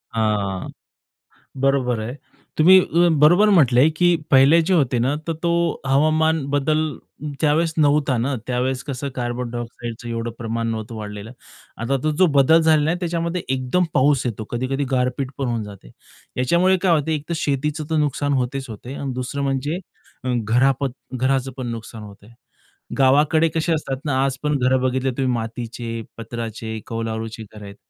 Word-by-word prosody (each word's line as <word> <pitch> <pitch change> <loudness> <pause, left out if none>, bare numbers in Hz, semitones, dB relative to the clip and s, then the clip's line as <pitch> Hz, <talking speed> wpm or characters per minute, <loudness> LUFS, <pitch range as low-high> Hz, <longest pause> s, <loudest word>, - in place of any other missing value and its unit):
हां. 105 -4 -1 0.9
बरोबर 135 -4 +1
आहे. 115 +4 -5 0.4
तुम्ही 185 +4 +8
अ, 175 0 +2
बरोबर 175 +8 +6
म्हटलंय, 140 - +5
की 175 +2 +3 0.2
पहिले 140 +5 +6
जे 175 +4 0
होते 135 -8 +2
ना, 130 +5 +1
तर 165 - 0
तो 170 -1 0
हवामान 155 +2 +2
बदल 145 +2 +1 0.6
त्यावेळेस 160 +2 +2
नव्हता 145 -3 +3
ना, 130 +4 -1
त्यावेळेस 130 +1 -1
कसं 140 -1 -4
कार्बन 120 0 -3
डायऑक्साईडचं 120 0 -6
एवढं 115 0 -3
प्रमाण 115 0 -3
नव्हतं 115 0 -4
वाढलेलं. 105 0 -7 0.5
आता 130 +4 -1
तो 155 - +1
जो 185 - +8
बदल 150 +4 +6
झालेला 155 -1 +3
आहे, 175 +2 -1
त्याच्यामध्ये 170 0 -2
एकदम 130 +7 +1
पाऊस 140 -1 +3
येतो, 110 -2 -3
कधी-कधी 130 +4 -2
गारपीट 130 +1 0
पण 135 -2 -2
होऊन 115 -2 -2
जाते. 100 -12 -12 0.5
याच्यामुळे 170 +9 +3
काय 185 0 +1
होत, 150 - -4
एक 150 -2 -2
तर - - 0
शेतीचं 150 +2 -1
नुकसान 145 -1 0
होतेच 130 0 -2
होते 120 +4 -8
आणि 135 -2 -4
दुसरं 130 +3 -3
म्हणजे 140 +5 -1 0.4
अ, - - -4 0.2
घरापत 135 +5 +2 0.2
घराचं 130 +1 0
पण 130 -2 -4
नुकसान 115 -1 -7
होतंय. 100 +1 -13 0.7
गावाकडे 150 +4 +4
कसे 165 +1 0
असतात 140 -4 -2
ना, 135 -3 +1
आज 135 -1 -1
पण 150 -1 +1
घर 130 +1 +3
बघितली 130 +1 0
तुम्ही 130 0 -1
मातीचे, 115 0 -5 0.2
पत्राचे, 115 -1 -5
कौलारुची 115 -1 -4
घरं 105 -1 -11
आहेत. 100 0 -10
130 Hz, 160 wpm, -21 LUFS, 120-150 Hz, 0.9 s, तुम्ही